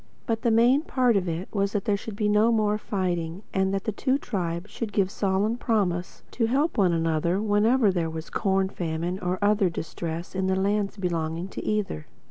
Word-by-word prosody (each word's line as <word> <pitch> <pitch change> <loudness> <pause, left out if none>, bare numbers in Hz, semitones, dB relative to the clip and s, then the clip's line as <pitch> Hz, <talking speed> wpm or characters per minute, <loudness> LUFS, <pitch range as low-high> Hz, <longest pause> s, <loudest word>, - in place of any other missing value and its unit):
But 225 -2 -1
the 240 - +2
main 240 +5 +5
part 255 -7 +2
of 185 -3 +1
it 170 +4 -3
all 205 - -2
was 200 0 +1
that 205 -2 -1
there 205 - +2
should 205 +1 -6
be 210 0 0
no 210 +2 +4
more 215 -2 +2
fighting; 180 -3 -2
and 190 0 +1
that 195 -1 -1
the 220 - -1
two 260 +6 +1
tribes 180 -7 -3
should 230 -3 -4
give 195 -2 +1
solemn 200 +4 0
promise 190 -7 -1
to 230 -2 0
help 285 +7 +1
one 195 -6 +3
another 165 +2 +1
whenever 215 +2 +3
there 170 -3 -1
was 160 0 -7
corn 190 -1 +1
famine 170 +1 -3
or 180 0 -1
other 205 -2 +3
distress 165 +1 -5
in 190 0 -1
the 190 - +2
lands 200 +2 0
belonging 170 -1 -2
to - - -6
either. 210 - -2
195 Hz, 205 wpm, -26 LUFS, 175-215 Hz, -, main